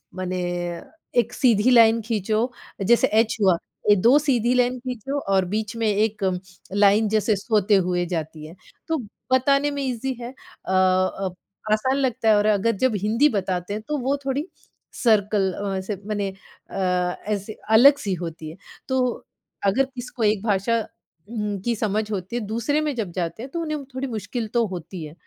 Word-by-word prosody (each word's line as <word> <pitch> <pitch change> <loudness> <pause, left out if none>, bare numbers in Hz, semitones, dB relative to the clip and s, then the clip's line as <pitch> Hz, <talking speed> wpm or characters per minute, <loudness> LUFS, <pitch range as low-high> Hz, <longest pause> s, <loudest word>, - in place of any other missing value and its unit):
माने 185 -1 -3 0.8
1 240 +1 0
सीधी 235 -2 +3
लाइन 230 -1 +6
खींचो 220 +2 -1 0.4
जैसे 240 +2 +5
एच 225 0 +1
हुआ, 185 -4 +4 0.4
2 240 +9 +5
सीधी 250 -5 +1
लाइन 250 0 +2
खींचो 255 +3 -4
और 190 -1 +3
बीच 220 +1 -2
में 225 -1 0
1 210 0 0 0.5
लाइन 205 +2 +4
जैसे 215 0 +2
सोते 205 0 +2
हुए 180 -1 +1
जाती 155 -1 -5
है। 165 +4 -11 0.3
तो 325 -1 0 0.3
बताने 275 +3 +3
में 285 0 -3
ईज़ी 260 +1 -2
है 235 - -5
अ 225 - -11
अ, 185 0 +2 0.4
आसान 260 +5 +2
लगता 250 -4 0
है 215 - +6
और 205 - +2
अगर 215 +2 +3
जब 260 -4 +3
हिंदी 230 +8 +3
बताते 185 -2 -2
हैं 215 - -4
तो 300 -1 -1
वो 270 +3 0
थोड़ी 280 +5 -1 0.6
सर्कल 205 -3 +3
अ, 200 0 -3
ऐसे 195 +2 -3
माने 205 -2 -1 0.4
अ, - - -8 0.5
ऐसे 210 0 -2 0.2
अलग 280 +4 +8
सी 195 -2 -1
होती 165 -2 -6
है। 160 - -10 0.3
तो 260 -1 +1 0.7
अगर 270 +5 +2
किसी 255 -2 -9
को 235 - -2
एक 210 -1 +2
भाषा 215 +2 +1 0.5
उम्म, 210 -4 -3
की 235 +2 0
समझ 215 0 -1
होती 195 +3 -4
है - - +1
दूसरे 235 +7 0
में 300 -2 -1
जब 205 -7 -3
जाते 175 +5 -4
हैं 265 - -7
तो 335 - -3
उन्हें 305 -3 -3
थोड़ी 270 +1 -2
मुश्किल 225 0 -4
तो 235 -1 +3
होती 180 -1 -7
है, 150 - -10
220 Hz, 175 wpm, -23 LUFS, 195-250 Hz, 0.8 s, अलग